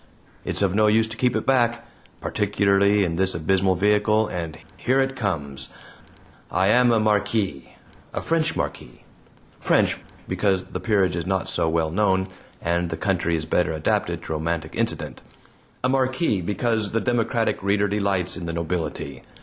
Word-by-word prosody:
It's - - -1
of 95 -2 +2
no 105 +1 +4
use 110 +1 +3
to 115 - -6
keep 125 0 +1
it 110 - -1
back 120 -3 +2 0.4
particularly 100 0 +2
in 85 -1 -2
this 95 -1 +1
abysmal 95 +3 +2
vehicle, 105 +3 +2
and 85 -3 -5 0.2
here 130 +2 +1
it 135 0 0
comes: 75 - -3 0.8
I 95 +2 +2
am 125 +2 +5
a 115 - +3
Marquis 105 - 0 0.4
a - - -3
French 165 0 +1
Marquis; - - -5 0.6
French, - - +2 0.3
because 95 -2 +1
the - - -6
peerage 100 -6 +1
is 85 0 -3
not 95 -1 0
so 80 - 0
well 80 -1 0
known, 95 0 +1 0.3
and 85 0 0
the 80 - -4
country 85 -2 0
is 80 -1 -2
better 85 +1 +1
adapted 80 -1 -1
to - - -4
romantic 80 0 -2
incident - - -2 0.6
a 130 - +2
Marquis, 130 - +1
because 105 +2 -1
the 115 - +2
democratic 115 -2 0
reader 100 +1 +2
delights 100 -3 0
in 85 -3 -6
the 85 - -3
nobility. 85 -2 -3
100 Hz, 160 wpm, -23 LUFS, 85-110 Hz, 0.8 s, am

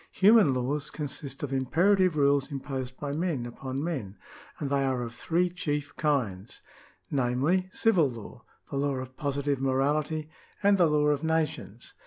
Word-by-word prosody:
^ - - -25
Human 205 -5 +6
laws 140 +4 -2
consist 140 -2 -5
of 140 -2 -3
imperative 175 +6 +3
rules 140 0 +2
imposed 130 -2 -5
by 145 -1 -3
men 155 -5 -1
upon 130 +3 -5
men, 130 - -4 0.4
and 140 -2 -4
they 140 -1 +2
are 130 -2 0
of 120 0 -6
three 170 +8 +1
chief 150 -5 -3
kinds, 120 -10 -1 0.5
namely, 140 +8 +1
civil 185 -11 +3
law, 115 -4 -10 0.3
the 140 - -2
law 140 0 0
of 130 0 -6
positive 140 -1 -1
morality, 150 +4 0 0.3
and 200 -1 +4
the 175 - +6
law 150 -1 +2
of 145 +1 0
nations. 160 -9 -2
140 Hz, 160 wpm, -28 LUFS, 130-160 Hz, 0.5 s, Human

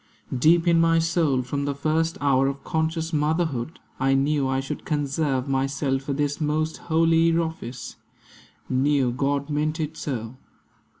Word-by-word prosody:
Deep 165 +7 +4
in 165 -1 +5
my 165 0 +4
soul, 160 -5 +1
From 140 +3 -3
the 140 -1 -2
first 160 +3 0
hour 135 -2 +3
of 140 0 -4
conscious 160 +1 -2
motherhood, 155 -2 -1 0.2
I 135 +1 +2
knew 140 0 +1
I 130 0 0
should 135 - -5
conserve 145 -3 -1
myself 135 0 0
for 140 0 -3
this 145 +2 -1
Most 155 +1 0
holy 165 +1 +3
office; 160 -7 -4 0.7
knew 135 -1 +2
God 140 +3 -1
meant 155 +2 -1
it 155 -1 -3
so. 120 -3 -5
145 Hz, 145 wpm, -24 LUFS, 135-160 Hz, 0.7 s, in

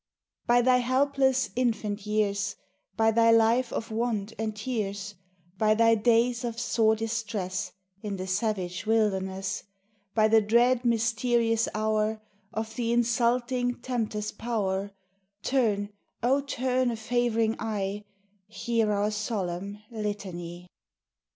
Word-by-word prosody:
By 245 0 +5
Thy 255 0 +5
helpless 265 +1 +2
infant 220 -4 -1
years; 205 -1 0 0.4
By 225 0 +4
Thy 230 +1 +4
life 230 +2 +4
of 225 - -4
want 220 -2 -1
and 220 -1 -2
tears; 210 -3 -3 0.5
By 215 0 +4
Thy 230 +1 +5
days 235 +2 +2
of 235 -1 -3
sore 220 -2 +2
distress 220 -4 -3 0.3
In 205 -2 -4
the 185 - -4
savage 185 -1 -2
wilderness; 195 -3 0 0.5
By 215 -1 +5
the 220 0 +5
dread 235 +4 +3
mysterious 230 0 +2
hour 215 0 0 0.3
Of 220 0 -4
the 235 -1 0
insulting 240 +1 +1
tempter's 215 -4 -2
power, 200 -4 -2 0.5
Turn, 215 -6 +1 0.3
O, 265 +4 +3
turn 255 -2 0
a 235 - -2
favoring 225 -1 0
eye, 205 -2 -3 0.4
Hear 225 0 0
our 205 +1 +1
solemn 205 -2 -3
litany! 185 -5 -5
225 Hz, 120 wpm, -27 LUFS, 210-240 Hz, 0.5 s, By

